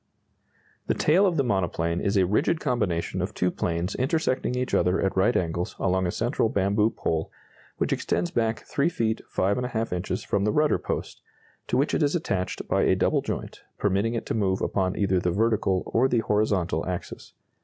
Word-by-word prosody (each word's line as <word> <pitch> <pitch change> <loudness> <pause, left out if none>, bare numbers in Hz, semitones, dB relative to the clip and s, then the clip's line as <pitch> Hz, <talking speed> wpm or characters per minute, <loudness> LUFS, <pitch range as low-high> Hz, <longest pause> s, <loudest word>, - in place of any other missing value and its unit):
] - - -37
The - - +1
tail 185 +6 +4
of 175 -3 0
the 140 - +3
monoplane 85 -6 0
is 100 +1 +1
a 95 - +4
rigid 140 - +1
combination 110 - -1
of - - -4
two 90 0 +1
planes 85 +3 -2
intersecting 130 -2 0
each 125 0 -2
other 90 +2 +2
at 95 - 0
right 100 +6 +3
angles 85 0 -2
along 95 -1 +1
a - - -1
central 115 +1 0
bamboo 105 -1 +2
pole 80 -7 -2 0.5
which - - 0
extends 85 0 -1
back 115 -1 0
3 140 +4 0
feet 115 -8 -1
5½ 110 +2 0
inches 90 0 -3
from 100 - 0
the 105 - +2
rudder 150 +5 +2
post, - - -4 0.5
to 125 - 0
which 140 +3 +1
it - - +1
is 145 +2 +2
attached 95 - -2
by - - +2
a - - +3
double - - +2
joint, - - -5 0.2
permitting 105 +3 +1
it 115 - -3
to - - -2
move 95 -3 +1
upon 95 -2 -1
either 95 -2 +2
the 90 - 0
vertical 100 -1 +1
or 125 +3 +2
the 120 -3 +1
horizontal 100 -7 0
axis. 90 -1 -6
100 Hz, 190 wpm, -26 LUFS, 90-125 Hz, 0.5 s, tail